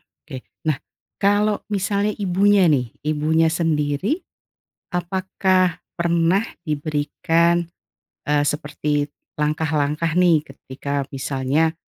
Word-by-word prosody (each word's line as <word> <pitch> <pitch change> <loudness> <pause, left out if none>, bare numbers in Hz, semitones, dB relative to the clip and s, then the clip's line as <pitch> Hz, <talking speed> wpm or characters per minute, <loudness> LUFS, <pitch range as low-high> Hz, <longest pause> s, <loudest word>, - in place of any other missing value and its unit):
Oke, 130 -4 -12 0.2
nah, 155 -3 +1 0.4
kalau 205 +1 +2
misalnya 200 +1 0
ibunya 195 0 +3
nih, 125 -5 +1
ibunya 155 +2 +2
sendiri, 165 - 0 0.7
apakah 185 0 +1 0.2
pernah 170 +4 +2 0.2
diberikan, 160 +3 +1 0.6
eee, 145 0 +2
seperti 145 0 -1 0.3
langkah-langkah 150 +1 0
nih? 170 -4 +5
Ketika, 140 +1 -5
misalnya, 135 +4 0
160 Hz, 85 wpm, -22 LUFS, 145-185 Hz, 0.7 s, nih